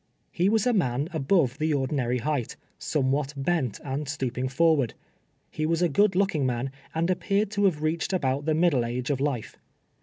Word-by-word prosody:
lie 180 Hz, -, +4 dB
was 220 Hz, -1 st, +2 dB
a 250 Hz, -, +3 dB
man 140 Hz, -, 0 dB
above 140 Hz, -3 st, +1 dB
the 155 Hz, +1 st, +1 dB
ordinary 130 Hz, -2 st, 0 dB
height, 140 Hz, -2 st, -2 dB, 0.2 s
some 135 Hz, -3 st, 0 dB
what 145 Hz, +1 st, -1 dB
bent 135 Hz, -, -1 dB
and 140 Hz, +1 st, -3 dB
stooping 130 Hz, -3 st, -2 dB
forward. 140 Hz, -2 st, +2 dB, 0.6 s
lie 155 Hz, -, +2 dB
was 165 Hz, +2 st, +1 dB
a 175 Hz, -, +3 dB
good 195 Hz, +6 st, +3 dB
looking 185 Hz, -6 st, +1 dB
man, 125 Hz, +1 st, -1 dB, 0.2 s
and 165 Hz, +3 st, +1 dB
appeared 200 Hz, +3 st, 0 dB
to 205 Hz, -1 st, +1 dB
have 155 Hz, -6 st, +1 dB
reached 160 Hz, +2 st, -1 dB
about 140 Hz, -6 st, 0 dB
the 155 Hz, -1 st, +1 dB
middle 160 Hz, -7 st, +3 dB
age 125 Hz, +3 st, -2 dB
of 135 Hz, -, -1 dB
life. 140 Hz, -6 st, -2 dB
150 Hz, 185 wpm, -26 LUFS, 130-170 Hz, 0.6 s, lie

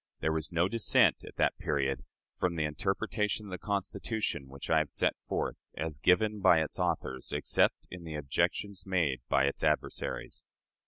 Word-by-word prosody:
There 80 Hz, -, +1 dB
was 80 Hz, -2 st, -2 dB
no 85 Hz, +1 st, +2 dB
dissent, 115 Hz, +2 st, +3 dB
at -, -, -11 dB
that -, -, +1 dB
period, 70 Hz, -3 st, 0 dB, 0.3 s
from 90 Hz, -2 st, 0 dB
the 80 Hz, -, 0 dB
interpretation 105 Hz, +7 st, -1 dB
of -, -, -9 dB
the 90 Hz, -, -5 dB
Constitution 100 Hz, -, -2 dB
which 70 Hz, 0 st, -8 dB
I 80 Hz, -, +6 dB
have 75 Hz, -2 st, -1 dB
set -, -, +1 dB
forth, -, -, -1 dB, 0.2 s
as 75 Hz, -2 st, -3 dB
given 105 Hz, +7 st, +3 dB
by 95 Hz, -4 st, +6 dB
its 80 Hz, -, -2 dB
authors, 65 Hz, -1 st, -1 dB
except -, -, +2 dB
in 90 Hz, -1 st, -8 dB
the 80 Hz, -2 st, -6 dB
objections 90 Hz, +7 st, -1 dB
made 80 Hz, -10 st, +1 dB
by 70 Hz, -1 st, +4 dB
its 70 Hz, -, -2 dB
adversaries. 75 Hz, -1 st, -1 dB
80 Hz, 170 wpm, -31 LUFS, 75-100 Hz, 0.3 s, I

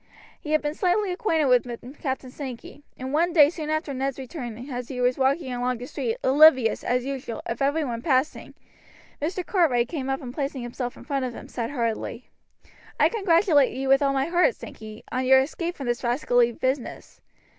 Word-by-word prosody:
He 300 Hz, -, -4 dB
had 310 Hz, -, +2 dB
been 295 Hz, 0 st, -1 dB
slightly 370 Hz, +3 st, +1 dB
acquainted 330 Hz, -4 st, +1 dB
with 250 Hz, +1 st, 0 dB
Captain 265 Hz, -2 st, -3 dB
Sankey; 260 Hz, 0 st, -8 dB, 0.2 s
and 260 Hz, +2 st, -5 dB
one 340 Hz, +3 st, +2 dB
day 300 Hz, -3 st, +7 dB
soon 310 Hz, -3 st, -6 dB
after 310 Hz, -2 st, -1 dB
Ned's 270 Hz, 0 st, -2 dB
return 250 Hz, -4 st, -7 dB
as 250 Hz, -3 st, -5 dB
he 255 Hz, -, -6 dB
was 250 Hz, 0 st, +2 dB
walking 265 Hz, 0 st, +1 dB
along 245 Hz, 0 st, -1 dB
the 245 Hz, -, -7 dB
street 455 Hz, -, -3 dB
oblivious, 265 Hz, -4 st, +5 dB
as 250 Hz, 0 st, 0 dB
usual, 265 Hz, -4 st, -5 dB
of 230 Hz, +2 st, -4 dB
every 285 Hz, +3 st, +1 dB
one 235 Hz, -3 st, -4 dB
passing, 265 Hz, +1 st, 0 dB, 0.7 s
Mr. 355 Hz, +4 st, -2 dB
Cartwright 270 Hz, -, +2 dB
came 270 Hz, -4 st, -4 dB
up 270 Hz, 0 st, -1 dB
and 245 Hz, -1 st, -7 dB
placing 275 Hz, -3 st, -3 dB
himself 245 Hz, 0 st, -5 dB
in -, -, -12 dB
front 275 Hz, -3 st, -2 dB
of 245 Hz, -2 st, -5 dB
him, -, -, -9 dB
said 235 Hz, -2 st, -4 dB
heartily: 235 Hz, -2 st, -3 dB, 0.7 s
"I -, -, +5 dB
congratulate 335 Hz, -, +3 dB
you 265 Hz, 0 st, -2 dB
with 270 Hz, +1 st, +5 dB
all 280 Hz, -1 st, +2 dB
my 270 Hz, 0 st, +1 dB
heart, 355 Hz, +9 st, +2 dB
Sankey, 215 Hz, 0 st, -10 dB
on 255 Hz, -, -1 dB
your 265 Hz, 0 st, +7 dB
escape 335 Hz, +6 st, -2 dB
from 275 Hz, -, -6 dB
this 240 Hz, +1 st, -2 dB
rascally 245 Hz, -1 st, +2 dB
business. 260 Hz, +2 st, -4 dB
270 Hz, 195 wpm, -25 LUFS, 245-310 Hz, 0.7 s, day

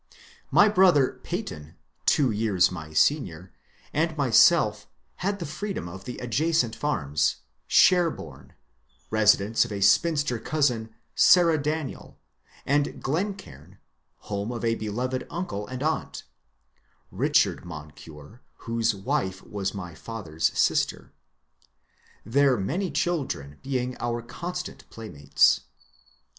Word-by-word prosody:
My 205 Hz, -, +6 dB
brother 180 Hz, -9 st, +4 dB
Peyton, 75 Hz, 0 st, -6 dB, 0.3 s
two 135 Hz, -5 st, +3 dB
years 105 Hz, -5 st, +2 dB
my 80 Hz, -3 st, -8 dB
senior, 90 Hz, -, 0 dB, 0.4 s
and 160 Hz, +1 st, 0 dB
myself 130 Hz, -6 st, +4 dB, 0.3 s
had 200 Hz, +2 st, -1 dB
the 175 Hz, -, -5 dB
freedom 195 Hz, -, -5 dB
of 95 Hz, +2 st, -10 dB
the 125 Hz, -, -6 dB
adjacent 125 Hz, 0 st, 0 dB
farms, 75 Hz, -, 0 dB
— 65 Hz, -1 st, -46 dB
" -, -, -45 dB
Sherboume," 80 Hz, -, +2 dB, 0.6 s
residence 110 Hz, 0 st, +3 dB
of 120 Hz, -, -7 dB
a 100 Hz, -, -3 dB
spinster 125 Hz, -, +2 dB
cousin, 125 Hz, -8 st, 0 dB, 0.2 s
Sarah 170 Hz, -3 st, +5 dB
Daniel; 150 Hz, -2 st, -4 dB, 0.5 s
and 145 Hz, +1 st, +2 dB
^^ -, -, -10 dB
Glencaim," 140 Hz, -, -4 dB, 0.4 s
home 100 Hz, +2 st, -4 dB
of 120 Hz, -1 st, -4 dB
a 115 Hz, -, +2 dB
beloved 120 Hz, +4 st, -3 dB
uncle 135 Hz, -, -4 dB
and 130 Hz, +1 st, -5 dB
aunt 160 Hz, +1 st, -2 dB, 0.9 s
(Richard -, -, +1 dB
Moncure, 75 Hz, -, -11 dB, 0.2 s
whose 115 Hz, -1 st, 0 dB
wife 95 Hz, -3 st, -2 dB
was 100 Hz, -1 st, -4 dB
my 90 Hz, -4 st, -7 dB
father's 80 Hz, -5 st, -5 dB
sister), -, -, 0 dB, 1.1 s
their 135 Hz, +3 st, +3 dB
many 170 Hz, -, -2 dB
children 130 Hz, -, -2 dB
being 125 Hz, -2 st, -2 dB
our 120 Hz, -1 st, -2 dB
constant 180 Hz, +8 st, -7 dB
playmates. 75 Hz, -12 st, +1 dB
115 Hz, 115 wpm, -26 LUFS, 95-150 Hz, 1.1 s, My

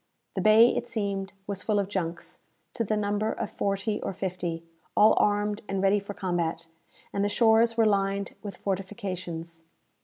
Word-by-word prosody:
The -, -, -2 dB
bay, 220 Hz, +3 st, +6 dB
it 240 Hz, -, -2 dB
seemed, 200 Hz, -4 st, -2 dB
was 200 Hz, -1 st, -4 dB
full 215 Hz, -2 st, 0 dB
of 200 Hz, -1 st, +1 dB
junks, 175 Hz, -4 st, -4 dB, 0.3 s
to 230 Hz, -, -1 dB
the 215 Hz, 0 st, 0 dB
number 210 Hz, +1 st, 0 dB
of 225 Hz, -, -4 dB
forty 200 Hz, +2 st, -1 dB
or -, -, -3 dB
fifty, 175 Hz, -3 st, -3 dB, 0.3 s
all 215 Hz, +1 st, +7 dB
armed 205 Hz, 0 st, +1 dB
and 195 Hz, 0 st, -1 dB
ready 195 Hz, +2 st, +3 dB
for 200 Hz, 0 st, -8 dB
combat; 170 Hz, -3 st, -2 dB, 0.5 s
and 200 Hz, -, 0 dB
the 205 Hz, -, +1 dB
shores 230 Hz, +1 st, +4 dB
were 225 Hz, -, +5 dB
lined 200 Hz, -1 st, +1 dB
with 205 Hz, -3 st, -7 dB
fortifications. 185 Hz, -4 st, -5 dB
200 Hz, 165 wpm, -27 LUFS, 190-210 Hz, 0.5 s, all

